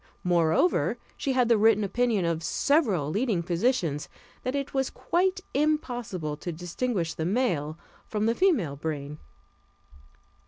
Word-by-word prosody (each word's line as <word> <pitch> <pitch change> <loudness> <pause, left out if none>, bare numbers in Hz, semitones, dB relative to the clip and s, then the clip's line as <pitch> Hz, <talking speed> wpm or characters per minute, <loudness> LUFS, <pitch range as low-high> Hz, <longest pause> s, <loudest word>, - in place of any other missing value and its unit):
Moreover, 170 - +2 0.2
she 270 - -1
had 250 -2 +3
the 230 -2 +4
written 215 -1 +4
opinion 220 -2 +1
of 165 -1 0
several 200 - +1
leading 210 -4 0
physicians, 170 - 0 0.3
that 255 +2 -2
it 280 0 -3
was 270 -1 +1
quite 370 +2 0
impossible 245 - -1
to 175 +3 -5
distinguish 175 +2 -2
the 160 - -4
male 170 - 0 0.3
from 215 0 -1
the 230 - +3
female 235 - +2
brain. 150 0 -5
205 Hz, 130 wpm, -27 LUFS, 165-255 Hz, 0.3 s, the